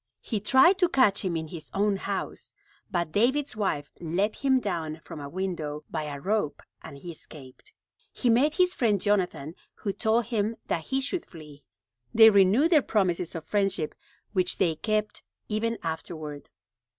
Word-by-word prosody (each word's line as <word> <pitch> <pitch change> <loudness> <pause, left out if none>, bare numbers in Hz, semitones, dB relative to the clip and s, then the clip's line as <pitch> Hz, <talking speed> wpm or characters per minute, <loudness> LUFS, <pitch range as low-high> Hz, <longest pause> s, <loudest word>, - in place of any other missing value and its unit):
He 220 - -2
tried 265 - +5
to 360 -2 +4
catch 215 -8 +3
him 175 -3 -1
in 160 -1 -5
his 165 -2 -9
own 200 0 +2
house, - - -5 0.3
but 170 -3 -1
David's 260 - +1
wife 170 -9 -2
let 180 +6 -1
him 265 -2 +3
down 165 -8 -3
from - - -9
a 140 -1 -7
window 165 -4 -4
by 155 -2 -2
a 145 -1 -5
rope 185 -4 -1 0.2
and 140 - -10
he 170 +5 -8
escaped. 140 -5 -13 0.4
He 250 - -2
met 260 +6 +4
his 365 -1 +3
friend 215 -5 +1
Jonathan, 180 -7 0 0.2
who 200 -3 -3
told 220 +3 +1
him 220 -1 -1
that 165 - -2
he 270 0 0
should 300 +6 -2
flee. 150 -4 -13 0.5
They 220 0 +9
renewed 205 - +4
their 310 -4 +6
promises 180 -7 0
of 160 - -6
friendship, 195 -6 0 0.4
which 185 -2 +1
they 170 -4 +2
kept 215 +5 -2 0.3
ever 230 +2 0
afterward. 160 -2 -6
195 Hz, 165 wpm, -27 LUFS, 160-225 Hz, 0.5 s, They